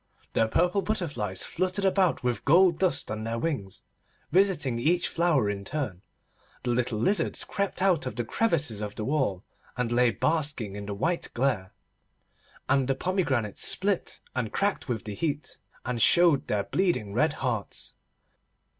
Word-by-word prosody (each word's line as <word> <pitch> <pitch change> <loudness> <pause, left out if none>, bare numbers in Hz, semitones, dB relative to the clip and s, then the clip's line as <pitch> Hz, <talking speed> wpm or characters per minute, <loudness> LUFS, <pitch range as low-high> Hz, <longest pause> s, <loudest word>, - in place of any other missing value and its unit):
The 115 - +3
purple 180 - +2
butterflies 145 - -2
fluttered 185 +2 -1
about 190 -5 +2
with 125 -1 -1
gold 170 +2 +5
dust 165 - +1
on 110 0 -4
their 115 +1 -2
wings, 115 - -3 0.5
visiting 170 -11 +2
each 170 +7 +2
flower 165 -9 +2
in 100 -1 -3
turn; 110 - -4 0.6
the 120 - 0
little 120 -2 0
lizards 195 - +1
crept 200 -2 -2
out 175 -8 +2
of - - -5
the 120 - -2
crevices 145 - +1
of 105 -1 -5
the 105 - -4
wall, 130 -10 0 0.3
and 125 -2 -1
lay 120 0 +4
basking 140 -6 -1
in 100 0 -6
the 100 - -3
white 170 - -1
glare; 120 -7 0 1.0
and 135 -2 +2
the 135 - +1
pomegranates 135 - -1
split 195 -1 0
and 125 -4 -2
cracked 200 -7 -1
with 110 -4 -2
the 105 - -4
heat, 145 +6 -3 0.3
and 125 -2 -2
showed 170 -2 +5
their 105 -1 0
bleeding 170 - 0
red 150 +7 +2
hearts. 120 -8 -4
135 Hz, 155 wpm, -27 LUFS, 110-175 Hz, 1.0 s, gold